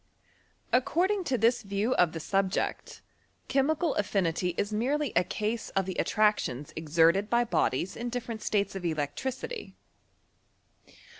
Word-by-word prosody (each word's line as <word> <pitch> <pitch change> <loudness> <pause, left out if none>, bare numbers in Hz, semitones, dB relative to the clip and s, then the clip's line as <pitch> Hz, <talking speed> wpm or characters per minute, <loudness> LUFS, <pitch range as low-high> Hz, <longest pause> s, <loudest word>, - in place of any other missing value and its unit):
According 365 +10 +2
to 265 -5 +1
this 235 +2 +3
view 200 +4 -1
of 175 -2 +3
the 165 - -5
subject, 195 +3 -1 0.4
chemical 295 +4 +1
affinity 180 -4 0
is 205 +1 -1
merely 270 +5 0
a 175 - +5
case 220 +4 -3
of 195 -1 +2
the 190 - -3
attractions 210 - +1
exerted 165 +6 +3
by 240 0 +3
bodies 180 - 0
in 240 +1 -4
different 235 -2 -4
states 205 -1 0
of 190 - -5
electricity. 175 - -3
210 Hz, 130 wpm, -29 LUFS, 180-250 Hz, 0.4 s, a